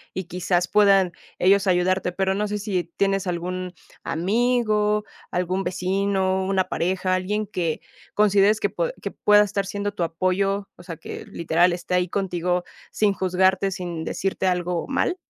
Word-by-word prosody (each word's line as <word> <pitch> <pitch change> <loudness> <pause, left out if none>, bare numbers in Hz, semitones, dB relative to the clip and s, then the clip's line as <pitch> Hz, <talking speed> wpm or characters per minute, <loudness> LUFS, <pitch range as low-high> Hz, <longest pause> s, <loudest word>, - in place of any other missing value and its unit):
y 190 - -2
quizás 175 0 -1
puedan 195 -2 +4 0.3
ellos 195 +2 +3
ayudarte. 180 0 +1
Pero, 190 +1 0
¿no 210 +2 -1
sé 210 0 -2
si 200 -4 -2
tienes 195 -1 +1
algún 180 +1 -3 0.3
amigo, 210 +2 +1 0.3
algún 180 +2 -1
vecino, 190 +1 0
una 190 0 +1
pareja, 185 +1 -1
alguien 205 +4 -1
que 170 -5 -2 0.3
consideres 205 0 +4
que - - 0
pue - - -2
que - - -3
pueda 210 0 +5
estar 200 -1 -2
siendo 205 +1 -3
tu 190 - -6
apoyo? 190 +4 0
¿O 175 - -13
sea 170 -2 -7
que - - -8
literal 170 +2 +2
esté 175 +1 -5
ahí 180 -1 +2
contigo 180 -2 -1 0.3
sin 210 -2 +2
juzgarte, 190 +1 +2
sin 175 -3 -5
decirte 190 +2 -2
algo 180 -1 -1
mal? 275 +6 0
190 Hz, 155 wpm, -23 LUFS, 180-200 Hz, 0.3 s, pueda